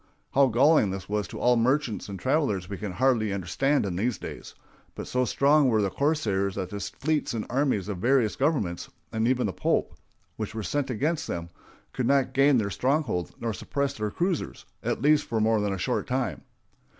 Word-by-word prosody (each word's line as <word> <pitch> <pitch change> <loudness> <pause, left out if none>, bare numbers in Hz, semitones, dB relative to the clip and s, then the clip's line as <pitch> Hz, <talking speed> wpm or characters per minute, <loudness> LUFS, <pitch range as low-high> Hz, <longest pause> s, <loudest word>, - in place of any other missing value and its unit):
How 140 0 +5
galling 130 -1 +4
this 95 0 -5
was 105 0 -1
to - - -8
all 125 0 +4
merchants 125 -2 0
and 100 - -5
travelers 130 - 0
we 100 - -6
can 105 -4 -4
hardly 120 -2 +2
understand 100 +9 0
in 95 -3 -3
these 115 +2 0
days; - - -9 0.4
but - - -6
so 125 0 0
strong 140 +2 +4
were 110 -3 +2
the 95 - 0
corsairs 105 -11 0
that 90 -1 -4
the 100 - -4
fleets 150 +5 -2
and 110 - -3
armies 130 -7 +1
of 100 -4 -4
various 120 0 +2
governments, 130 - -1 0.2
and 110 +1 0
even 125 -2 +2
of 95 - -3
the - - -24
Pope, - - +1 0.4
which 110 0 -5
were 110 - -3
sent 145 +5 -1
against 150 +7 -1
them, 85 0 -4 0.4
could 125 -2 -1
not 140 -1 +2
gain 140 0 +5
their 100 -3 0
stronghold 130 - -1
nor 115 -1 -2
suppress 140 +7 -2
their 105 -4 -3
cruisers, 175 - -2 0.2
at - - -2
least 150 0 +4
for 115 - -1
more 110 0 +2
than 105 -1 0
a 95 - -2
short 90 - -1
time. - - -2
115 Hz, 200 wpm, -27 LUFS, 100-140 Hz, 0.4 s, How